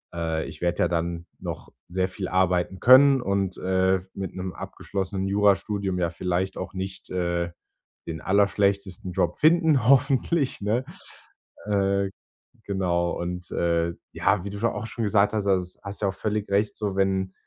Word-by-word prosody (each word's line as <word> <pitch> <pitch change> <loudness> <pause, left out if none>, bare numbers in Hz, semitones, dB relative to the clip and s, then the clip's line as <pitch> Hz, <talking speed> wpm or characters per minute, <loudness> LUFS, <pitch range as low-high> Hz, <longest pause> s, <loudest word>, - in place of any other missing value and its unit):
äh, 80 -1 -1
ich 80 0 -10
werde 85 0 +1
ja - - +3
dann 85 0 -2
noch - - -6 0.2
sehr 95 +1 0
viel 95 0 -5
arbeiten 90 0 +1
können 130 +4 +7
und, 100 -3 -1
äh, 95 0 +2
mit 95 -2 -5
'nem 95 0 -4
abgeschlossenen 95 0 -4
Jurastudium 100 -1 +1
ja 85 -1 +1
vielleicht 90 +2 -2
auch - - -5
nicht, 95 0 -6
äh, 85 -1 -1 0.6
den 80 -1 -5
allerschlechtesten 100 -2 +1
Job 85 0 0
finden, 155 -6 +4
hoffentlich, 135 0 +3
ne? 115 +6 0 0.8
Äh, 100 -1 +1 0.6
genau 90 -3 0
und, 90 0 -5
äh, 85 0 +1 0.2
ja, 100 -2 +1
wie - - -3
du 100 - -6
scho 115 +1 +2
auch 105 +2 -5
schon 115 - -4
gesagt 105 0 +3
hast, 105 -2 -1
also, 90 -2 0
hast 100 +1 -7
du 100 - +1
ja - - +2
auch - - -15
völlig 105 +1 -2
recht 100 +1 +1
so 100 -3 -2
wenn 95 -1 0
95 Hz, 165 wpm, -25 LUFS, 90-105 Hz, 0.8 s, können